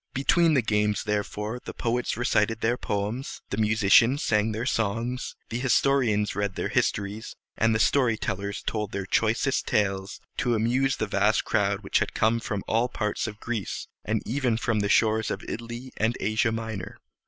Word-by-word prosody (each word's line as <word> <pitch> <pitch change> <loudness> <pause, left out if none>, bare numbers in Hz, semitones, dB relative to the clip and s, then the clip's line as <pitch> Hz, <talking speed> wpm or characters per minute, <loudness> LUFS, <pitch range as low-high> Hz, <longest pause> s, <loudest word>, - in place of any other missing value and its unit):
Between 160 +4 +3
the 130 - +3
games, 105 -1 +1
therefore, 105 +2 -2
the - - -8
poets 120 0 -1
recited 115 -2 +1
their 120 +2 +2
poems, 105 +4 -3
the 100 - -2
musicians 110 +5 +4
sang 105 0 +2
their 110 +2 -3
songs, 115 +3 -1
the 115 - -3
historians 125 -5 +2
read 100 -1 -1
their - - -2
histories, 105 +2 -1 0.2
and 110 0 +2
the - - +1
story 120 -2 +3
tellers 100 0 -3
told 105 -2 -2
their 100 -1 -3
choicest 115 +7 +1
tales, 95 -2 0 0.2
to 120 -5 +1
amuse 125 +5 +1
the - - -1
vast - - +2
crowd - - +1
which - - +1
had - - -2
come 110 +2 +3
there - - -8
from 100 -2 -2
all 115 +3 +1
parts 105 -1 -2
of 105 -1 -8
Greece, 115 -5 -4 0.2
and 105 0 -1
even 125 -1 0
from 115 -2 0
the 100 0 0
shores 110 0 +3
of - - -4
Italy 120 +3 -6
and 110 +2 +1
Asia 110 +2 +1
Minor. 110 -4 -5
110 Hz, 175 wpm, -26 LUFS, 105-120 Hz, 0.2 s, musicians